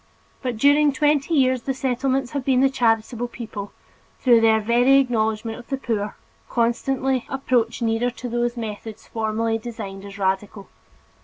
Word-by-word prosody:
But 250 -4 -3
during 285 +4 +5
twenty 295 +2 +1
years, 260 -3 +3
the 270 +2 -3
Settlements 260 0 -1
have 280 -3 -3
seen 260 -2 +3
the 270 0 +4
charitable 235 -1 +1
people, 220 -4 -7 0.5
through 240 -3 +4
their 220 -1 +4
very 245 +5 +4
knowledge 220 -2 0
of 230 +1 -6
the 270 - -2
poor, 215 -5 -3 0.3
constantly 255 +2 0
approach 240 -4 0
nearer 225 +2 +1
to 245 +1 -7
those 240 0 -1
methods 220 -1 -6
formerly 225 0 -1
designated 200 -4 -7
as - - -11
radical. 195 +1 -2
240 Hz, 150 wpm, -23 LUFS, 220-265 Hz, 0.5 s, during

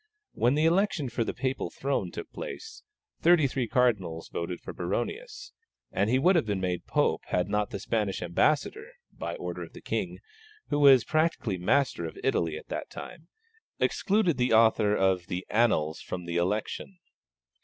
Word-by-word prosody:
When 125 +4 +2
the 155 +2 +2
election 170 -5 +2
for 120 0 -1
the - - -2
Papal 130 +1 -2
throne 140 +1 -2
took - - -8
place, 445 -3 -7 0.4
thirty 170 -3 +5
three 130 -2 -1
cardinals 105 -11 0
voted 85 +1 -4
for - - -8
Baronius, 420 - -4 0.4
and 100 - +1
he 125 - +3
would 180 +8 +4
have 160 -10 +2
been 100 -2 -1
made 90 -2 -2
Pope - - +1
had 90 - 0
not 105 0 0
the 100 - -4
Spanish 105 -1 -1
ambassador, 155 - 0 0.2
by - - -5
order - - -5
of - - -9
the - - -10
King, - - -3 0.5
who 145 - +1
was 135 -4 +7
practically 155 - 0
master 125 -1 +1
of - - -10
Italy 80 -2 0
at - - -11
that - - -4
time, 165 0 -10 0.5
excluded 195 - +2
the 125 -2 +2
author 110 -2 +4
of 95 -3 +1
the 90 +1 -4
Annals 95 -9 +2
from 90 -1 -6
the 85 0 -2
election. 105 - -2
120 Hz, 170 wpm, -28 LUFS, 95-155 Hz, 0.5 s, was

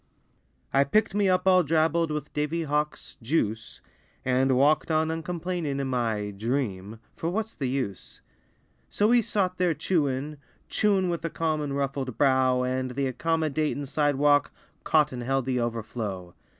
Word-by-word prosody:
I 140 - +5
picked 215 +9 +1
me 205 -1 +2
up 185 0 +2
all 185 -1 +6
drabbled 165 +1 +1
With 150 -1 -4
Davy 150 +3 -1
Hawk's 150 0 -2
"juice" 115 -4 -2 0.4
And 130 0 +2
walked 145 +5 +3
on 160 0 +1
uncomplainin' 165 -2 -3
In 135 - -2
my 115 -5 -1
"dream," 110 -2 -3 0.2
for 165 - -3
what's 220 +4 -3
the 135 -4 -3
use? 125 -8 -4 0.7
So 210 +2 +2
he 240 0 +5
sot 185 -4 -1
there 175 -3 +2
chewin', 145 -3 -1 0.3
chewin' 195 -3 +2
With 170 -1 -3
a 165 - -1
calm 160 -1 -1
unruffled 140 -3 -3
brow, 130 -2 +3
And 130 0 -1
the 135 -2 -1
accommodatin' 155 -2 -1
sidewalk 145 0 +2 0.3
Caught 155 -2 +3
and 125 -1 -5
held 135 +1 0
the 130 -1 0
overflow. 110 -6 -4
145 Hz, 150 wpm, -26 LUFS, 130-165 Hz, 0.7 s, all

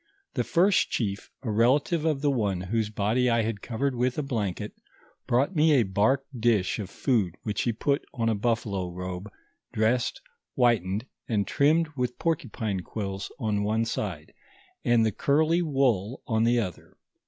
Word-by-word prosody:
The - - 0
first 185 +3 +3
chief, 100 -4 -2
a 115 - -2
relative 140 +9 +2
of 150 -4 +1
the 145 -1 +2
one 100 -8 0
whose 105 +3 -1
body 110 +4 +1
I 115 -1 +2
had 110 -2 -3
covered 135 +4 -1
with 125 +1 0
a 150 - 0
blanket, 105 - -3 0.5
brought 130 +9 +2
nr,e 155 0 +5
a 130 -4 +5
bark 110 +8 +1
dish 110 -6 +1
of 100 -3 -5
food 105 - 0
which 105 -1 -1
he 120 - +1
put 140 +6 0
on 115 -3 -1
a 115 - +2
buflfalo 100 -5 -1
robe, 90 +3 -6 0.4
dressed, 115 +3 +1 0.4
whitened, 110 -4 +2 0.2
and 105 -3 +1
trimmed 155 +3 +3
with 125 -2 -2
por 165 -1 +2
cupine 110 -8 -4
quills 95 -2 -5
on 105 -5 -1
one 110 +2 +1
side, 90 -9 -4 0.5
and 120 -2 +4
the 110 - +2
curly 160 - +2
wool 130 - 0
on 110 -1 +1
the 120 +1 +3
other. 95 -7 -4
115 Hz, 165 wpm, -27 LUFS, 105-135 Hz, 0.5 s, nr,e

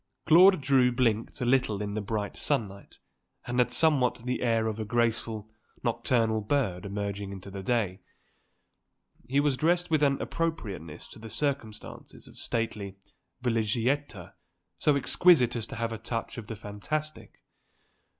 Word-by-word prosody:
Claude 185 +3 +7
Drew 130 -2 +3
blinked 120 0 0
a - - 0
little 120 -5 +2
in 105 -1 -3
the 110 - -2
bright 105 0 -3
sunlight 100 -9 -3 0.5
and 125 +1 -1
had 125 - +4
somewhat 140 -7 +3
the 125 0 -2
air 115 -2 +2
of 110 0 -2
a - - -1
graceful, 110 -1 -1 0.3
nocturnal 115 -1 +1
bird 105 -6 -1
emerging 100 0 -4
into 95 0 -9
the 100 0 -6
day. 100 -3 -1 1.3
He 135 +3 +2
was 145 -2 +2
dressed 175 +4 +1
with 155 -2 +3
an 140 -2 +3
appropriateness 105 - -4
to - - -10
the 110 +1 -9
circumstances 115 -3 -4
of - - -12
stately 105 -4 -3 0.5
villégiature 115 - -1 0.5
so 150 - +3
exquisite 140 -3 +4
as 115 -2 -3
to - - -8
have 115 0 -2
a 115 - -5
touch 115 +1 -4
of 110 - -9
the 110 - -5
fantastic. 150 +10 -5
115 Hz, 150 wpm, -28 LUFS, 105-135 Hz, 1.3 s, Claude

